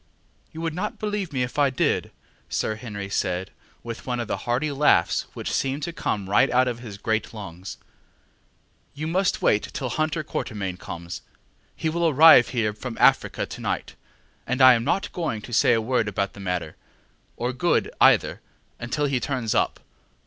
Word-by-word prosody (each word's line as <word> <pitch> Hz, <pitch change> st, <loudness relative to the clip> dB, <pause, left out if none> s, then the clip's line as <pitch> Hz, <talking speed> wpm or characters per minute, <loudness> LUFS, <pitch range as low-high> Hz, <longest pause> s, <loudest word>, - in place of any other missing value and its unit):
ŌĆ£You 160 Hz, -, -5 dB
would 165 Hz, -1 st, -2 dB
not 195 Hz, +5 st, -3 dB
believe 205 Hz, -4 st, -3 dB
me 130 Hz, -3 st, 0 dB
if 125 Hz, +4 st, -4 dB
I 140 Hz, -1 st, +4 dB
did, 130 Hz, -, +1 dB
ŌĆØ -, -, -17 dB, 0.4 s
Sir 110 Hz, -, -1 dB
Henry 105 Hz, -4 st, -6 dB
said, 95 Hz, -1 st, -2 dB, 0.3 s
with 115 Hz, +1 st, -7 dB
one 125 Hz, -1 st, -1 dB
of 120 Hz, -, -3 dB
the -, -, -1 dB
hearty 135 Hz, +5 st, +1 dB
laughs 140 Hz, -, +3 dB
which -, -, -4 dB
seem 135 Hz, +1 st, 0 dB
to 170 Hz, +3 st, -4 dB
come 100 Hz, -10 st, -2 dB
right 100 Hz, -, +4 dB
out 125 Hz, +1 st, +3 dB
of 120 Hz, -1 st, -3 dB
his 110 Hz, -5 st, -9 dB
great 110 Hz, +1 st, -2 dB
lungs. 95 Hz, -2 st, -8 dB, 1.2 s
ŌĆ£You 155 Hz, +2 st, -3 dB
must 185 Hz, +3 st, 0 dB
wait 105 Hz, -, +2 dB
till 130 Hz, -, -3 dB
Hunter 155 Hz, +4 st, -1 dB
Quatermain 100 Hz, -10 st, -4 dB
comes; 85 Hz, -1 st, -7 dB, 0.5 s
he -, -, -3 dB
will 170 Hz, +1 st, +1 dB
arrive 150 Hz, -4 st, +8 dB
here 115 Hz, -4 st, 0 dB
from 115 Hz, +2 st, -7 dB
Africa -, -, +3 dB
to -, -, -9 dB
night, -, -, -3 dB, 0.5 s
and 125 Hz, +2 st, -1 dB
I 130 Hz, -1 st, +9 dB
am 115 Hz, -1 st, 0 dB
not 195 Hz, +9 st, 0 dB
going 160 Hz, -11 st, -2 dB
to 120 Hz, -, -9 dB
say 120 Hz, -, +4 dB
a 115 Hz, -, +3 dB
word 115 Hz, -1 st, 0 dB
about 100 Hz, -1 st, -2 dB
the -, -, -12 dB
matter, 90 Hz, -4 st, -3 dB, 0.6 s
or 125 Hz, +2 st, -2 dB
Good 170 Hz, +7 st, +1 dB
either, -, -, +4 dB, 0.4 s
until 120 Hz, +5 st, -1 dB
he 135 Hz, -3 st, 0 dB
turns 125 Hz, -4 st, -2 dB
up. -, -, +1 dB
125 Hz, 185 wpm, -24 LUFS, 105-150 Hz, 1.2 s, I